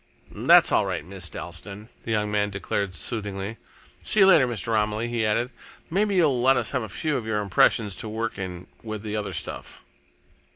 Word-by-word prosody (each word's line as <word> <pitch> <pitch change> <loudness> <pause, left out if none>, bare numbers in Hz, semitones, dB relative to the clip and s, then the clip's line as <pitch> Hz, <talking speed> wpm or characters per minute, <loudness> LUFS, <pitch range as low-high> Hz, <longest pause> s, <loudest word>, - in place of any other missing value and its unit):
"That's - - +5
all - - +3
right, - - -3
Miss 90 -1 -6
Dalstan," 105 +3 -8 0.2
the 115 - -3
young 105 -1 0
man 105 0 +1
declared 100 -1 -3
soothingly. 105 -1 -3 0.5
"See 210 - +2
you - - +9
later, 160 -9 +6
Mr. 115 -1 -2
Romilly," 105 +1 0
he 120 -1 -1
added. 115 +4 0 0.4
"Maybe 200 +3 +1
you'll 145 -9 +3
let 135 +2 +5
us - - 0
have 130 - 0
a 110 - -6
few 145 - -1
of 115 - -5
your 110 -1 0
impressions 100 +1 +3
to 110 - -4
work 115 0 -3
in 90 -2 -6 0.2
with 110 -2 -6
the 105 -1 -4
other 105 -1 -3
stuff." - - -6
110 Hz, 195 wpm, -25 LUFS, 100-120 Hz, 0.5 s, you